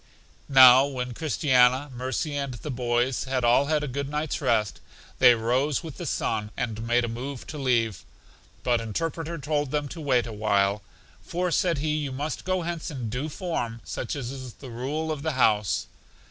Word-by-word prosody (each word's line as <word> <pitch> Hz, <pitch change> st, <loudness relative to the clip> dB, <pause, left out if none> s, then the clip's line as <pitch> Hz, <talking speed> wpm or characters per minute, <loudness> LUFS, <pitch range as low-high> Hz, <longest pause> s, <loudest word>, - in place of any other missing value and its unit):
Now 130 Hz, 0 st, +8 dB
when 125 Hz, -3 st, -4 dB
Christiana, 130 Hz, -2 st, +2 dB
Mercy 130 Hz, +4 st, -3 dB
and 140 Hz, -3 st, -3 dB
the 150 Hz, +5 st, -6 dB
boys 120 Hz, +1 st, 0 dB
bad 130 Hz, -1 st, -1 dB
all 120 Hz, +4 st, +4 dB
had 155 Hz, -1 st, +1 dB
a -, -, -2 dB
good 140 Hz, +2 st, -3 dB
night's 150 Hz, +1 st, -2 dB
rest, 105 Hz, -6 st, +1 dB, 0.4 s
they 125 Hz, -2 st, +8 dB
rose 130 Hz, +7 st, 0 dB
with 160 Hz, -4 st, -8 dB
the 175 Hz, -, -5 dB
sun, 105 Hz, -4 st, -1 dB
and 110 Hz, -2 st, -3 dB
made 120 Hz, 0 st, +3 dB
a -, -, -4 dB
move 125 Hz, +3 st, -6 dB
to 150 Hz, -, -7 dB
leave; 115 Hz, -7 st, 0 dB, 0.6 s
but 120 Hz, -2 st, +2 dB
Interpreter 165 Hz, +9 st, -3 dB
told 145 Hz, -1 st, -1 dB
them 145 Hz, +1 st, -1 dB
to 165 Hz, -, -8 dB
wait 130 Hz, -5 st, +2 dB
a 115 Hz, -, -6 dB
while. 100 Hz, -1 st, +1 dB, 0.4 s
For, 180 Hz, +1 st, -2 dB
said 170 Hz, -2 st, +2 dB
he, 150 Hz, +1 st, 0 dB
you 145 Hz, -3 st, -3 dB
must 145 Hz, +4 st, -4 dB
go 185 Hz, -1 st, 0 dB
hence 170 Hz, -1 st, -4 dB
in 130 Hz, -7 st, -5 dB
due 135 Hz, +6 st, -3 dB
form, 130 Hz, -9 st, -3 dB
such 90 Hz, -, -4 dB
is 130 Hz, -2 st, -6 dB
the 130 Hz, -3 st, -11 dB
rule 145 Hz, +7 st, -3 dB
of 150 Hz, -2 st, -4 dB
the 160 Hz, 0 st, -1 dB
house. 105 Hz, -6 st, +2 dB
130 Hz, 185 wpm, -26 LUFS, 120-150 Hz, 0.6 s, Now